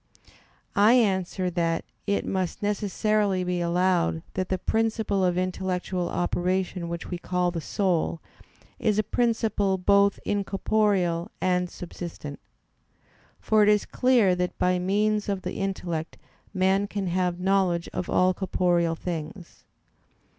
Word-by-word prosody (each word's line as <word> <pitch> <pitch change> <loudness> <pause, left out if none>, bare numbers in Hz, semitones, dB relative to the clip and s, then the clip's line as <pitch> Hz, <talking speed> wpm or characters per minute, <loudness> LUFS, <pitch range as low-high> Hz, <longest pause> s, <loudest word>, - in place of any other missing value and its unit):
I 210 +3 +6
answer 190 -5 +1
that, 165 -1 0 0.2
It 200 - 0
must 185 0 -2
necessarily 205 -1 +1
be 180 -1 -1
allowed 175 -1 +1
that 185 0 -2
the 185 - 0
principle 220 -2 0
of 180 -1 +1
intellectual 185 -1 -2
operation 180 0 -1
which 170 +2 -6
we 175 - -3
call 180 0 0
the 170 -2 -4
soul, 175 -2 0 0.6
is 210 -2 +1
a 215 - +3
principle 220 -5 +1
both 200 +2 +3
incorporeal 195 -3 0
and 180 -1 +1
subsistent. 170 -5 -8 1.0
For 215 -1 +3
it 210 - +5
is 210 -1 +3
clear 245 -7 +3
that 180 0 -2
by 180 0 +2
means 210 +3 +1
of 195 -2 -2
the 180 - -4
intellect 175 -5 -3 0.3
man 190 +1 +2
can 200 -1 -3
have 180 0 0
knowledge 185 -2 +1
of 180 - -3
all 185 0 +3
corporeal 175 -3 +1
things. 170 +2 -7
185 Hz, 130 wpm, -26 LUFS, 175-200 Hz, 1.0 s, I